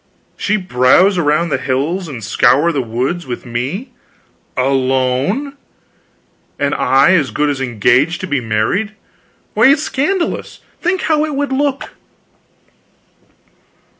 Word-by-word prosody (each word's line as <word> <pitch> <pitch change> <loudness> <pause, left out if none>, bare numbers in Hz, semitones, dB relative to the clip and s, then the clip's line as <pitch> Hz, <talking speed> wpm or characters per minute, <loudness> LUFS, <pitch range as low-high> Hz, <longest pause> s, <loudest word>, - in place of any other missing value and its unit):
She 210 +1 0
browse 180 +3 +3
around 160 +2 +1
the 135 - -1
hills 150 +8 -2
and 125 -7 -8
scour 140 +11 +3
the 145 -4 -1
woods 130 +8 -3
with 125 0 -6
me 130 - -4 0.7
alone 135 - 0 1.0
and 145 0 0
I 135 +6 +3
as 155 -7 +2
good 150 0 0
as 135 -2 -4
engaged 130 +6 +1
to 185 - -4
be 145 -6 -1
married? 120 - -1 0.6
Why, 225 +4 +5
it's 285 +2 +3
scandalous. 335 +6 -2 0.2
Think 365 +2 0
how 310 -1 +2
it 305 -2 -3
would 285 0 -2
look." 275 0 -1
150 Hz, 125 wpm, -16 LUFS, 130-215 Hz, 1.0 s, Why